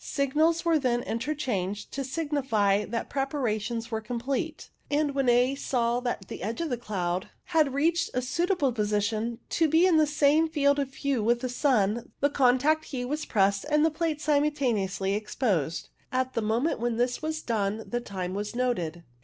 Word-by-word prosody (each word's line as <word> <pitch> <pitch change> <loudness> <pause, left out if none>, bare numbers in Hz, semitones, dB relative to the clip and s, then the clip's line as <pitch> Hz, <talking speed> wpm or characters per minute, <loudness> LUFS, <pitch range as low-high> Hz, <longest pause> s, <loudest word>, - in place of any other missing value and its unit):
Signals 310 +5 +1
were 330 -2 +3
then 245 -3 0
interchanged, 230 -6 -3
to 275 - -3
signify 265 -9 0
that 230 +2 -3
preparations 240 -5 -2
were 220 -1 -2
com 235 +2 -4
plete, 275 +6 -3 0.2
and 290 0 +1
when 270 -2 +1
A 245 +2 +4
saw 245 -3 0
that 240 -6 -3
the - - -7
edge 225 +4 -3
of 335 -4 -2
the - - +2
cloud 185 -5 -3
had 310 -5 +1
reached 330 +4 +2
a 250 - +1
suitable 335 +1 +1
position 215 +1 -1
to 325 - +2
be 325 +4 +5
in 355 -4 +4
the 310 -1 +4
same 300 +2 +3
field 285 -2 +2
of 275 -2 -1
view 275 -3 -1
with 235 +2 +2
the 255 - -2
sun, 235 -4 +1
the 285 +1 +2
contact 280 +4 +3
key 250 -4 -4
was 300 +4 -3
pressed 200 -1 +2
and 300 +1 +4
the 320 - +2
plates 310 -1 -2
simultaneously 240 -11 +1
exposed. 205 - -1 0.2
At 260 0 -1
the 230 - 0
moment 225 +8 0
when 235 -1 -1
this 245 +1 0
was 315 0 -3
done 215 -1 -1
the 240 0 -2
time 185 -5 -5
was 205 +3 -4
noted. 175 -10 -1
250 Hz, 180 wpm, -27 LUFS, 215-295 Hz, 0.2 s, be